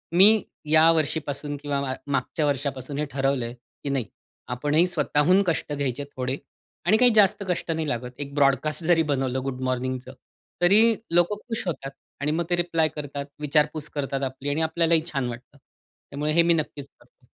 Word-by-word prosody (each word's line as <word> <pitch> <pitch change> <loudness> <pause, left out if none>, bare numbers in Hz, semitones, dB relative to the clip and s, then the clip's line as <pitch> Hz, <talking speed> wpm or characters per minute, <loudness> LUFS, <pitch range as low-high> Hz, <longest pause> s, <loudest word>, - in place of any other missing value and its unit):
मी 210 +3 +7 0.3
या 160 +1 +7
वर्षीपासून 145 -2 -1
किंवा 145 -1 -1 0.3
मागच्या 140 +3 -1
वर्षापासून 140 -1 -2
हे 150 - 0
ठरवलंय 135 -3 -1
की 125 +3 -10
नाही 135 -4 -1 0.5
आपणही 150 +6 +2
स्वतःहून 175 +1 +2
कष्ट 160 -2 -1
घ्यायचे 140 -1 -2
थोडे, 130 +1 -2 0.5
आणि 205 +5 +5
काही 245 +1 +6
जास्त 200 -1 +4
कष्ट 175 -1 -1
नाही 160 -1 -2
लागत, 125 0 -3
एक 140 -1 -6
ब्रॉडकास्ट 145 +2 +2
जरी 165 -1 +4
बनवलं 130 -2 0
गुड 130 -1 -4
मॉर्निंगचं 130 0 -3 0.5
तरी 215 +6 +5 0.2
लोकं 175 +4 +3
खुश 225 -2 -3
होतात 135 -4 -4 0.3
आणि 145 +1 +1
मग 170 +2 -1
ते 175 - +3
रिप्लाय 170 -2 +1
करतात, 145 -1 -5 0.2
विचारपूस 150 +1 +1
करतात 140 -1 -2
आपली 135 +1 -3
आणि 145 +3 0
आपल्यालाही 165 0 +2
छान 135 -3 -1
वाटतं, 120 +4 -10
त्यामुळे 145 +2 -7
हे 170 - +6
मी 170 0 +4
नक्कीच 150 -3 -3
करतो. - - -27
145 Hz, 165 wpm, -25 LUFS, 135-165 Hz, 0.5 s, मी